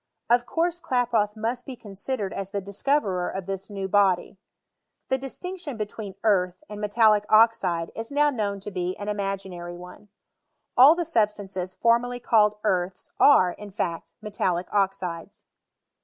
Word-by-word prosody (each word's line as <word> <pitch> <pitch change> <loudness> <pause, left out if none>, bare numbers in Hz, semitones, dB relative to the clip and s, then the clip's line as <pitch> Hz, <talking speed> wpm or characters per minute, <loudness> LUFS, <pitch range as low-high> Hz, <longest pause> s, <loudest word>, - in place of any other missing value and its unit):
Of 240 0 +4
course 345 +1 0
Klaproth 235 -6 +1
must 235 +3 -3
be 265 - -6
con 210 -4 -12
sidered 200 0 -3
as 195 -1 -4
the 200 0 -2
discoverer 200 -1 0
of 190 -1 -5
this 195 +1 -5
new 195 -2 -4
bctdy. 195 -1 +2 0.7
The 265 - +1
distinction 315 +1 -6
between 210 -2 -6
earlh 185 -4 +2
and 210 0 -8
raetaUic 210 0 +3
oxide 205 -7 +3
is 225 +2 -6
now 295 +1 +3
known 205 -5 -2
to 205 - -7
be 180 -1 -3
an 205 0 -5
imaginary 195 -4 -4
one. 180 +4 -12 0.7
All 275 +6 +8
the 345 0 -2
substances 200 - -1
formerly 240 +1 +2
called 210 -3 +3
earths 180 -3 -1
are, 185 -11 +6
in 210 +3 -10
fact, 180 -5 -4
metallic 185 -4 -2
oxides. 190 -4 -2
205 Hz, 150 wpm, -25 LUFS, 190-235 Hz, 0.7 s, All